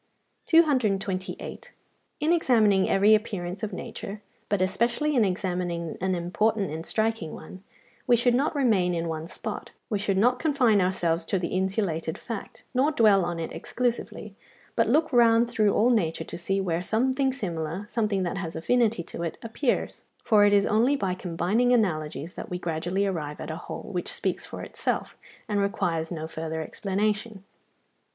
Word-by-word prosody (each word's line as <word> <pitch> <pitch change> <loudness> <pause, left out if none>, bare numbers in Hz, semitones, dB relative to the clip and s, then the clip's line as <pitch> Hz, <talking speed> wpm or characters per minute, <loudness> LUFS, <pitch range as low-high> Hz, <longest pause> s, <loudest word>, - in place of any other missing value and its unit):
228. 215 - +1 0.5
In 310 +3 +2
examining 220 - +3
every 200 +2 +5
appearance 200 -4 -1
of 215 -1 -3
nature, 195 +2 -7 0.3
but 205 - +1
especially 235 +10 +1
in 240 - +5
examining 180 -3 -2
an 190 0 +1
important 195 +3 0
and 160 +2 -5
striking 220 -7 -1
one, 185 +4 -11 0.4
we 245 - +6
should 240 +1 +3
not 275 +5 +1
remain 205 -10 +2
in 165 0 -2
one 160 0 -4
spot, - - -6 0.2
we 205 - +1
should 195 -1 0
not 245 +5 +3
confine 255 -10 +3
ourselves 175 -2 +1
to 195 - -1
the 175 -2 -2
insulated 185 -4 -1
fact, 230 -4 -7
nor 265 +4 +3
dwell 210 - +5
on 175 0 -2
it 165 - -4
exclusively, 235 -4 -3 0.4
but 230 -2 +2
look 305 +3 +2
round 235 -1 +5
through 215 -3 +2
all 235 +5 +3
nature 170 -9 +1
to - - -8
see 195 +3 -1
where 175 -3 -1
something 260 +7 +1
similar, 175 - -4
something 210 -4 0
that 180 +2 -2
has 170 -3 -5
affinity 225 +2 +1
to 170 - -8
it, 170 -1 -3
appears: 230 +3 -1 0.2
for 210 -3 +5
it 205 - +4
is 200 -1 +4
only 235 +7 +3
by 195 -9 -1
combining 185 +7 0
analogies 160 - 0
that - - -7
we 180 - -3
gradually 175 +3 -1
arrive 155 -6 -3
at 155 - -5
a - - -4
whole 180 +4 -7
which 180 - -3
speaks - - -2
for - - -7
itself, - - -2 0.3
and 205 -2 0
requires 175 -5 -1
no 160 -2 -4
further 160 0 -4
explanation. 205 +2 -2
200 Hz, 165 wpm, -26 LUFS, 175-230 Hz, 0.5 s, we